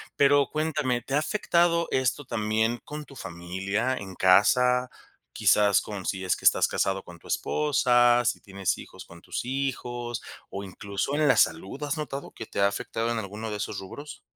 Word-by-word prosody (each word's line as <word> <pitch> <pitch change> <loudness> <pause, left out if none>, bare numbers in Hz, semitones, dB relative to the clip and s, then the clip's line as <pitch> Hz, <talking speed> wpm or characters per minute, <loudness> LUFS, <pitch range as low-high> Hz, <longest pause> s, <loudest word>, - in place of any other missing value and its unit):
pero 140 0 +4
cuéntame, 150 -5 -1
¿te 135 - -7
ha 145 - +4
afectado 170 0 +2
esto 130 +2 0
también 110 +1 0
con 150 0 -7
tu 140 - -15
familia 95 +6 -2
en 95 -2 -8
casa? 125 +8 +4 0.4
Quizás, 100 -2 +4
con 100 -3 -7
si 95 -1 -2
es 90 - +2
que - - -13
estás - - +5
casado 95 0 -1
con 85 -1 -13
tu - - -16
esposa, 120 -5 +3
si - - 0
tienes 95 -1 -2
hijos - - -11
con - - -14
tus - - -5
hijos, 120 -3 -3 0.3
o 100 - -5
incluso, 100 +6 -4
en 150 0 +2
la - - +5
salud. 95 - +1
¿Has 150 +2 -2
notado 140 -2 -5
que 115 - -8
te - - -5
ha 100 - +6
afectado 115 +3 -2
en 115 - -1
alguno 110 +2 -6
de 105 - -3
esos 105 0 -4
rubros? 145 +10 -9
120 Hz, 185 wpm, -27 LUFS, 100-140 Hz, 0.4 s, ha